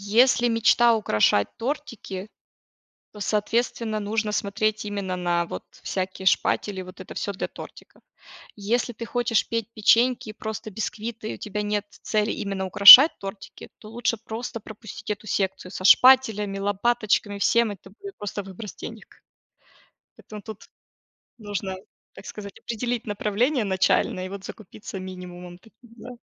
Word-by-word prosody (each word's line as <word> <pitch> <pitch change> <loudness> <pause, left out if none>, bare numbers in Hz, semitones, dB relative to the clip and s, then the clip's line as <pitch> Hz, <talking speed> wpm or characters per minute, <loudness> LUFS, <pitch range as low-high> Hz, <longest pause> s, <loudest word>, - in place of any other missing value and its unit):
если 245 0 +5
мечта 230 +1 +4
украшать 105 - +2
тортики, 235 -7 -5 0.9
то 210 - -12
соответственно 220 +1 -1
нужно 210 +1 -2
смотреть 215 +1 -1
именно 200 -3 -4
на 175 -1 0
вот - - -7 0.2
всякие 190 0 -4
шпатели, 190 0 +1
вот 185 +1 -13
это 185 - -11
всё 200 - -3
для 190 - -4
тортиков. - - -13 0.6
Если 235 +4 -1
ты 230 +1 -7
хочешь 240 -1 +1
петь 230 -1 -2
печеньки, 235 +2 +2
просто 220 0 -6
бисквиты 220 +2 -5
и - - -6
у - - -11
тебя 210 0 -4
нет 205 0 -1 0.2
цели 215 -1 0
именно 195 -2 -3
украшать 205 - +11
тортики, 195 0 -9
то 215 - -13
лучше 235 0 -1
просто 225 +1 -6
пропустить 215 0 -10
эту - - -17
секцию 190 -2 -2
со 185 - -7
шпателями, 220 -5 +5
лопаточками, 205 0 0
всем, 230 +2 +2
это 195 0 -13
будет 400 -1 -9
просто 205 0 -5
выброс 195 +2 -9
денег. - - -9 1.1
Поэтому 210 -1 -11
тут 215 0 -10 0.8
нужно, 205 -3 -4 0.4
так - - -13
сказать, 200 -2 -9
определить 235 0 -3
направление 215 +6 0
начальное 185 -1 +1
и - - -7
вот 195 0 -8
закупиться 205 -2 -9
минимумом 180 -1 -9
таким, 225 +3 -21
да. 245 - -10
210 Hz, 140 wpm, -24 LUFS, 195-230 Hz, 1.1 s, украшать